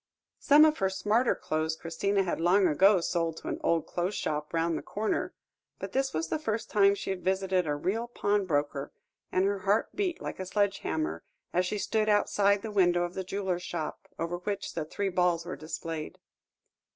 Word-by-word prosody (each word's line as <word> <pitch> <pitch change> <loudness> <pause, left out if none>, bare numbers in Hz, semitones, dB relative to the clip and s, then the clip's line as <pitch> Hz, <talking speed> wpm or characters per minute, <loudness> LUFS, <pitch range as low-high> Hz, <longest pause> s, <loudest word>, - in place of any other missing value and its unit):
Some 300 +1 +7
of 310 0 +2
her 190 - +2
smarter 215 +5 +1
clothes 155 +1 -2
Christina 195 +5 0
had 175 -3 -2
long 185 +3 +4
ago 190 +4 +5
sold 165 -1 -1
to - - -6
an - - -3
old 165 -2 +2
clothes' 180 +3 -2
shop 150 0 -2
round 165 0 0
the - - -3
corner, 215 +1 -2 0.4
but - - -6
this 270 0 0
was 160 +1 -2
the - - -1
first 225 -6 -3
time 200 -1 +5
she 200 - -4
had 190 -1 -5
visited 190 -2 +1
a 145 - 0
real 205 +10 -1
pawnbroker, 165 -11 -1 0.4
and 185 +1 +2
her 200 0 0
heart 200 +3 +1
beat 365 -4 -1
like - - -6
a 185 - -3
sledge 205 +1 +1
hammer, 155 - -2 0.3
as 180 +1 +2
she 210 - -2
stood 215 +1 0
outside 200 -1 +3
the 220 - -4
window 175 -3 +3
of 175 0 -4
a 190 - -2
jeweller's 185 -1 -2
shop, 170 -3 -5
over 170 +1 -2
which 200 +2 -4
the 160 - -3
three 195 +5 -2
balls 175 -2 +1
were 175 - -5
displayed. 160 +1 -6
185 Hz, 195 wpm, -29 LUFS, 165-205 Hz, 0.4 s, Some